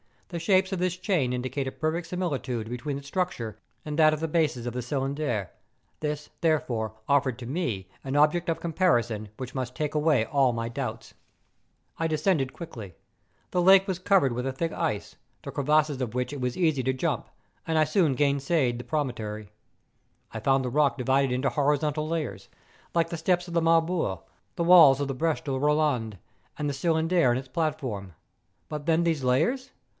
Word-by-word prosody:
The 170 - -4
shapes 190 +3 +2
of 190 - -2
this 180 -1 0
chain 180 -9 0
indicate 130 +2 -2
a - - -2
perfect 160 +4 -2
similitude 135 -11 -3
between 135 +4 -3
its 140 - -10
structure 140 - -3 0.3
and 150 +1 -3
that 155 -1 +6
of 155 - -2
the 160 - -1
bases 150 -7 0
of 120 - -3
the 125 - -3
Cylindre: 135 - -2 0.5
this, 150 -1 -3
therefore, 125 -9 0
offered 135 -4 +2
to 120 - -7
me 120 - -3
an 135 +1 -3
object 155 +4 +3
of 165 - -1
comparison 120 - +1
which 130 -1 -6
must 130 -2 -4
take 150 -1 -2
away 150 -6 +2
all 135 -2 +2
m}'' 115 0 -3
doubts. - - -5 0.9
I 165 - +1
descended 155 -3 +1
quickly. 115 - -9 0.6
The 180 - +1
lake 190 +2 +6
was 185 -2 -2
covered 185 -8 +3
with 125 +2 -3
a 135 - -2
thick 165 +5 -2
ice, 105 - -3 0.3
the - - -6
crevasses 150 -1 +1
of 120 -2 -3
which 125 0 -1
it 145 -2 -6
was 125 -1 -2
easy 160 -7 +2
to 130 +1 0
jump; 130 - -2 0.4
and 160 -1 +1
I 155 - +5
soon 155 -2 +2
gained 140 +1 +2
the 130 -5 0
promontory. 110 -8 -3 0.8
I - - -5
found 135 -1 +2
the 125 - -2
rock 145 +2 +2
divided 135 +1 +2
into 130 +2 +1
horizontal 150 +1 0
layers, 160 -2 -3 0.5
like 165 -1 +2
the 170 - -4
steps 175 +2 0
of - - -7
the 170 - +2
Marbore, 165 - +2 0.3
the 170 - -1
walls 165 -6 +7
of 140 - -2
the - - -1
Breche 160 +3 0
de 140 - -3
Boland, 135 -6 +1 0.4
and 150 - -2
the - - -2
Cylindre 165 0 +2
and 120 - +2
its 130 0 -7
platform. 130 - -3 0.6
But 150 -1 -5
then 165 +1 +3
these 165 -5 0
layers? 160 - +1
145 Hz, 185 wpm, -27 LUFS, 125-165 Hz, 0.9 s, walls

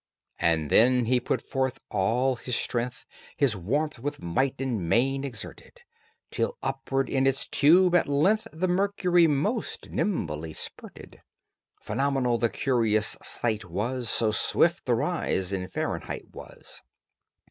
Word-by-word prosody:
And 80 -3 +1
then 125 +1 +5
he 125 +2 +2
put 125 - -2
forth 130 -1 -1
all 125 +7 +1
his 125 0 -3
strength, 125 +1 -2 0.3
His 135 -7 +2
warmth 140 - -2
with 145 +4 -4
might 130 +11 -1
and 115 -11 -2
main 135 +6 +2
exerted, 120 -7 -8 0.5
Till - - -2
upward 135 0 -1
in 135 0 +1
its 135 0 0
tube 175 +5 +5
at 175 - +4
length 175 +10 +2
The 165 +4 -1
mercury 180 -2 +3
most 180 - -2
nimbly 80 - -2
spurted. - - -9 0.6
Phenomenal 135 -4 0
the 115 - +2
curious 110 -5 +1
sight 110 -3 -2
was, 115 +8 -3
So 110 -2 +2
swift 105 - +2
the - - +3
rise 95 +1 -1
in 90 -1 -2
Fahrenheit - - -4
was. - - -11
130 Hz, 135 wpm, -27 LUFS, 110-140 Hz, 0.6 s, then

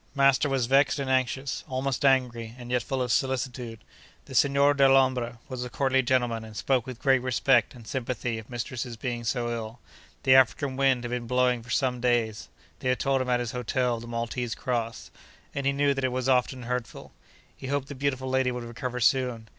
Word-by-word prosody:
Master 140 +1 +4
was 135 -3 +1
vexed 135 +3 +3
and 135 -2 -2
anxious—almost 130 +1 -1
angry, 120 -4 +1
and 120 -1 -9
yet 125 -1 +2
full 130 +2 -2
of 125 - -2
solicitude. 125 -4 -1 0.4
The - - -11
Signor 140 +2 +4
Dellombra 130 -3 +3
was 130 -2 -5
a 125 - -6
courtly 135 0 +2
gentleman, 120 -3 0
and 110 -1 -10
spoke 130 +2 0
with 130 -2 -6
great 135 0 +3
respect 125 0 +2
and 120 -2 -13
sympathy 120 -3 -3
of 110 - -12
mistress's 120 0 -5
being 120 0 -4
so 120 +1 -1
ill. 115 0 -6 0.4
The 130 - +5
African 130 +1 +4
wind 135 -2 +2
had 120 - -4
been 120 -1 -3
blowing 125 -1 +2
for 120 - -15
some 130 -2 0
days 115 -3 0 0.3
(they 130 - -1
had 130 - +1
told 135 -1 +1
him 130 - -3
at 125 -1 +2
his 120 -2 -3
hotel 125 0 -1
of - - -8
the 120 - -9
Maltese 115 0 -3
Cross), 115 -2 -3 0.4
and 140 -1 -2
he - - +4
knew 140 0 +2
that 135 -1 -3
it 130 - +1
was 130 0 -2
often 130 0 +1
hurtful. 125 0 -5 0.4
He 130 - -8
hoped 140 0 -1
the 145 - -7
beautiful 130 -1 -2
lady 130 -1 +1
would 125 -1 -5
recover 125 +1 -5
soon. 120 -2 +1
125 Hz, 200 wpm, -27 LUFS, 120-135 Hz, 0.4 s, The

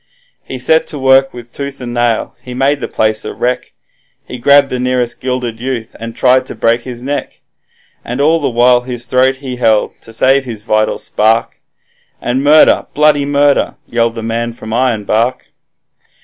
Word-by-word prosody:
He 130 - -7
set 160 +5 +2
to 150 - -4
work 135 0 +3
with 120 -1 -11
tooth 140 -1 -6
and 120 -2 -6
nail, 120 -2 0
he 125 -1 -9
made 140 +2 +1
the - - -3
place 110 +1 0
a - - -6
wreck; 125 +1 -2 0.5
He 125 - -8
grabbed 140 +2 +4
the 125 - -2
nearest 125 -1 -1
gilded 125 -3 -3
youth, 120 -2 -5
and 115 0 -7
tried 130 0 +3
to - - -6
break 115 +1 +1
his 120 0 -8
neck. 145 +2 -4 0.6
And 125 +3 -5
all 160 +3 +3
the 145 - -1
while 120 +1 +3
his 125 -1 -5
throat 130 +1 +2
he 130 -2 -7
held 110 -3 +2
to - - -12
save 135 +4 +2
his 110 -5 -8
vital 110 -1 +1
spark, 110 +2 0 0.6
And 130 +3 -1
'Murder! 150 +2 +5
Bloody 145 -1 +3
Murder!' 145 0 +2
yelled 115 -1 -1
the 115 - -6
man 115 +1 -2
from 110 -1 -9
Ironbark. 115 -1 0
125 Hz, 175 wpm, -14 LUFS, 115-135 Hz, 0.6 s, Murder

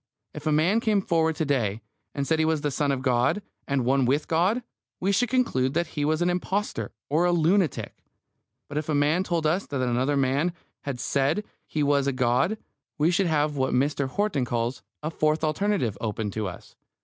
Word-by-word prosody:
If 150 +1 -6
a - - +3
man 165 +9 +3
came 215 -3 +2
forward 165 -4 +1
to 160 - -1
day, 115 -7 0 0.3
and 140 -1 -1
said 160 +2 +1
he - - +4
was 160 -1 +1
the 145 - -1
Son 145 +1 0
of 130 -1 -2
God, 125 +10 +2 0.2
and 135 -3 0
one 135 +1 +3
with 140 +5 +1
God, 185 +9 +2 0.4
we 190 +2 +1
should 235 +4 +2
conclude 135 - +1
that 170 -2 0
he 145 - -1
was 155 +3 +1
an 175 - +2
impostor 190 +3 -2 0.2
or 160 +5 +2
a 175 - +3
lunatic. 175 0 +1 0.7
But 145 +1 -2
if 155 - -6
a 150 - +1
man 150 +5 +2
told 170 -4 -1
us 175 +6 +1
that 140 - -3
another 125 +4 +1
man 140 +6 +1 0.3
had 135 -3 -3
said 140 +10 +1 0.2
he 150 - -1
was 140 -1 +2
a 140 - +1
god, 130 - +1 0.4
we 155 +3 +3
should 180 +1 +2
have 150 -2 +1
what 130 0 +1
Mr. 140 +1 +1
Horton 195 -4 0
calls 120 +1 -2 0.2
a 155 - -2
"fourth 155 0 +1
alternative" 155 - 0
open 105 -1 -2
to 110 0 -2
us. 90 - -10
150 Hz, 205 wpm, -26 LUFS, 135-175 Hz, 0.7 s, he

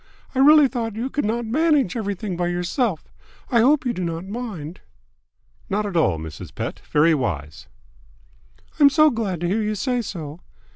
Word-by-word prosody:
I 260 - -2
really 295 +1 +7
thought 230 -4 -4
you 245 +4 -3
could 290 - -1
not 235 +2 -1
manage 290 - +2
everything 205 -3 -3
by 175 0 -1
yourself. 175 - -1 0.4
I 235 - +4
hope 275 +5 +3
you 245 - 0
do 185 - -4
not 165 +1 -4
mind." 195 -7 -6 0.9
"Not 210 +2 0
at 200 -3 -5
all, 150 - +2
Mrs. 80 -1 -9
Pett. - - -4
Very 155 +2 +4
wise." 95 - -3 1.1
"I'm 285 -1 +8
so 305 +2 +5
glad 205 -8 -3
to 175 - 0
hear 205 +5 0
you 215 0 -1
say 245 +4 -1
so." 165 -7 -7
210 Hz, 175 wpm, -22 LUFS, 170-245 Hz, 1.1 s, I'm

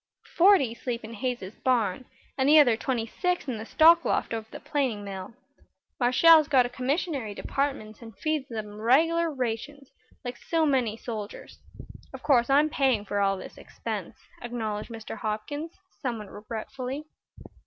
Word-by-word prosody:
"Forty 345 - +5
sleep 235 0 -4
in 220 +1 -8
Hayes's 240 -4 -4
barn, 245 -3 +1 0.3
and 265 +1 +2
the 310 - +8
other 260 -7 +6
twenty 235 -1 -2
six 360 +8 -2
in 240 -4 -3
the 220 - -7
stock 330 +1 +6
loft - - 0
over 220 -1 -4
the - - -9
planing 255 -8 -1
mill. 195 +1 -7 0.6
Marshall's 305 +5 +6
got 260 -4 +4
a - - -3
commissary 255 - -2
department 270 -6 -3
and 225 -4 -12
feeds 305 -2 -2
'em 210 -2 -6
regular 325 +8 +3
rations, 265 +2 -4 0.3
like 245 0 -5
so 325 -1 0
many 250 -7 +1
soldiers. 215 -4 -7 0.6
Of - - -11
course 245 -4 +3
I'm 290 +3 +5
paying 260 -9 +1
for 205 0 -2
all 195 -1 +2
this - - -10
expense," - - -6 0.3
acknowledged 220 -3 -4
Mr. 225 -2 -7
Hopkins, 290 +10 -4 0.3
somewhat 225 -7 -4
regretfully. 250 +6 -6
245 Hz, 155 wpm, -27 LUFS, 220-285 Hz, 0.6 s, the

